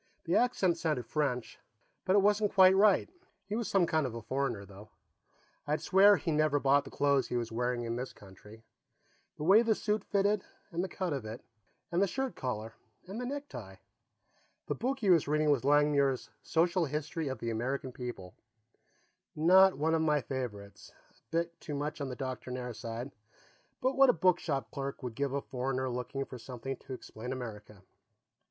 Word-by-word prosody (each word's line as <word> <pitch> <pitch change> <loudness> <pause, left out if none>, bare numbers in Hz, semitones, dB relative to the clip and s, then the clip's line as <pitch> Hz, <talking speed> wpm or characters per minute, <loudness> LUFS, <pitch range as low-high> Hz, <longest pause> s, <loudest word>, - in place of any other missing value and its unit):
The - - 0
accent 190 -9 +2
sounded 150 -8 -1
French, 125 -2 -2 0.5
but 185 - +3
it 200 - +5
wasn't 210 0 +2
quite 190 -1 +7
right. 200 0 +5 0.4
He 205 +2 -4
was 230 -1 -2
some 190 -3 +3
kind 155 -4 +1
of 115 - -7
a 115 - -5
foreigner, 125 -4 -2
though; 100 +2 -13 0.8
I'd 150 +1 +1
swear 200 +2 +6
that - - -6
he 170 - 0
never 150 -1 +2
bought 140 +1 +3
the - - -8
clothes 140 -2 +2
he 125 - -2
was 115 -1 -3
wearing 120 +1 -1
in 115 0 -3
this 125 +1 -4
country. 105 +3 -15 0.7
The - - -5
way 195 +7 +7
the 225 -2 +2
suit 210 -1 -1
fitted, 200 0 +1 0.3
and 170 +1 -1
the 190 - -3
cut 180 -4 -2
of 135 -4 -3
it, 110 +2 -8 0.5
and 175 +2 +1
the 200 - +4
shirt 265 +6 -3
collar, 110 -3 -4 0.3
and 200 +6 -6
the 250 - -3
necktie. 130 - -6 0.9
The - - -1
book 265 +3 -2
he 205 -7 +2
was 165 -5 +4
reading 150 0 +2
was 140 -4 +2
Langmuir's 140 -2 +2
Social 170 +1 +1
History 150 +2 -3
of 130 -1 -3
the 115 +1 -3
American 130 +4 -2
People 120 -8 -7 1.0
not 185 +4 +6
one 160 +3 +1
of 165 - +2
my 150 -2 +3
favorites, 115 -7 -6 0.2
a - - -30 0.2
bit 170 +1 -2
too 150 - -5
much 145 +1 -3
on 140 - -3
the 125 - -5
doctrinaire 125 -1 -5
side, 115 +4 -6 0.7
but 260 +1 +1
what 270 -1 +6
a - - +6
bookshop 155 - +1
clerk 140 0 -5
would 125 -2 -4
give 140 +3 -1
a 140 - -1
foreigner 130 0 -2
looking 125 +3 -3
for 125 - -9
something 130 +2 -6
to 135 - -9
explain 125 -1 -7
America. 105 -6 -7
140 Hz, 185 wpm, -31 LUFS, 125-180 Hz, 1.0 s, quite